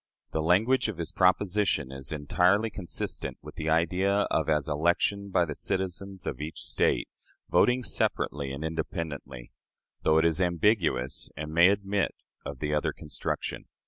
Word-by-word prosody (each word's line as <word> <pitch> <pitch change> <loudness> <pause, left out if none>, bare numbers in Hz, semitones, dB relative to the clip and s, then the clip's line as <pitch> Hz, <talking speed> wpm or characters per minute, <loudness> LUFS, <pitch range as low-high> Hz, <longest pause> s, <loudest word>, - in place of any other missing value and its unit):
The 80 - -1
language 110 +11 +3
of 110 -6 -4
his 85 -1 -4
proposition 90 -6 +2
is 65 -1 -7
entirely 90 +8 +2
consistent 95 -4 -4
with - - -9
the 80 0 -3
idea 90 +5 +2
of - - +1
as 75 -1 +1
election 85 +6 +1
by 90 -2 +3
the 75 - -4
citizens 95 +2 -3
of - - -4
each 75 +2 -5
State, - - +1 0.4
voting 125 +1 +4
separately 70 - -1
and 70 +3 -5
independently, 75 -6 -5 0.5
though 80 0 +3
it 80 - +4
is 85 +1 +2
ambiguous, 85 - +1
and 75 +1 -5
may 85 +3 +7
admit 100 -2 0 0.3
of 70 - -6
the 75 +2 -2
other 75 - 0
construction. 75 - -4
85 Hz, 150 wpm, -28 LUFS, 75-100 Hz, 0.5 s, may